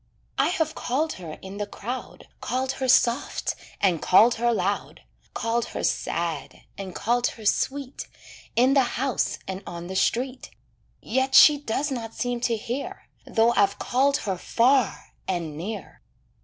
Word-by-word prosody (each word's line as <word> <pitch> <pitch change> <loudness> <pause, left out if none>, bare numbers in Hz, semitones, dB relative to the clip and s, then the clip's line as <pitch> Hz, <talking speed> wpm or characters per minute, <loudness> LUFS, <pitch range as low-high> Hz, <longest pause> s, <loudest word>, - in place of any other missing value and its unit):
I - - +4
have 320 -3 0
called 300 +6 -1
her 160 -3 -7
in 190 +1 -8
the 205 0 -3
crowd, 245 +5 -7
Called 260 +1 -1
her 265 -1 -3
soft 245 0 +2 0.3
and 180 -5 +2
called 220 +6 +6
her 240 0 +3
loud, 200 -2 -2 0.3
Called 230 0 0
her - - -6
sad 165 -5 -2
and 190 -2 -7
called 240 +2 +1
her 220 - -8
sweet, 270 +5 -1 0.5
In 255 +3 +4
the 275 - +5 0.2
house 265 0 0
and 190 0 -4
on 170 0 -6
the 190 +2 -6
street. 255 +6 0 0.5
Yet 265 +3 0
she 295 -2 +9
does 285 +2 -2
not 225 -3 -5
seem 245 -1 -2
to 235 -2 +1
hear, 270 - -5 0.2
Though 225 +1 +3
I've 200 -1 +3
called 275 +3 +2
her 190 -3 -2
far 250 +1 +2
and 170 -5 -2
near. 200 +8 -6
235 Hz, 155 wpm, -25 LUFS, 195-265 Hz, 0.5 s, she